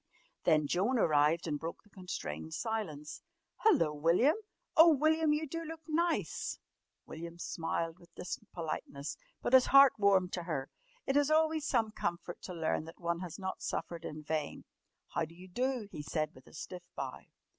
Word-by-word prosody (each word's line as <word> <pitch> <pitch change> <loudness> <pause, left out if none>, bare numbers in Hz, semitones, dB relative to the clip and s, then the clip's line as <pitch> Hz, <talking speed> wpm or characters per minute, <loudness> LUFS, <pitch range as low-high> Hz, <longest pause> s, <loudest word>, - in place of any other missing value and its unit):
Then 155 -3 +4
Joan 195 - +1
arrived 155 -3 +3
and 150 -3 -2
broke 165 +2 -6
the 210 - -25
constrained 80 - -5
silence. 175 -10 -4 0.4
"Hullo, 165 - +4
William! 170 - +4 0.4
Oh, 325 +1 +9
William, 315 +2 +3
you 300 +1 +1
do 330 +4 -4
look 325 0 -7
nice!" 335 +2 0 0.5
William 170 +1 -8
smiled 165 0 -2
with 170 -1 -20
distant 195 +3 -6
politeness, 155 -4 -4 0.3
but - - -1
his 260 -1 +8
heart 275 -1 +8
warmed 195 -3 +4
to 180 - -1
her. 140 -6 -3 0.3
It 270 - 0
is 290 0 +4
always 315 0 +3
some 225 -4 +2
comfort 175 -3 -4
to 185 - -6
learn 160 -1 0
that 165 - -11
one 170 -1 -1
has 180 -3 -6
not 190 -1 -4
suffered 170 -1 -3
in 155 -1 -6
vain. 155 -1 -3 0.4
"How 170 - -1
d'you 170 +4 -9
do?" 245 +3 -1
he 150 - -6
said 155 +1 -2
with 130 - -17
a - - -16
stiff 180 +3 -8
bow. - - -4
180 Hz, 170 wpm, -33 LUFS, 160-260 Hz, 0.5 s, Oh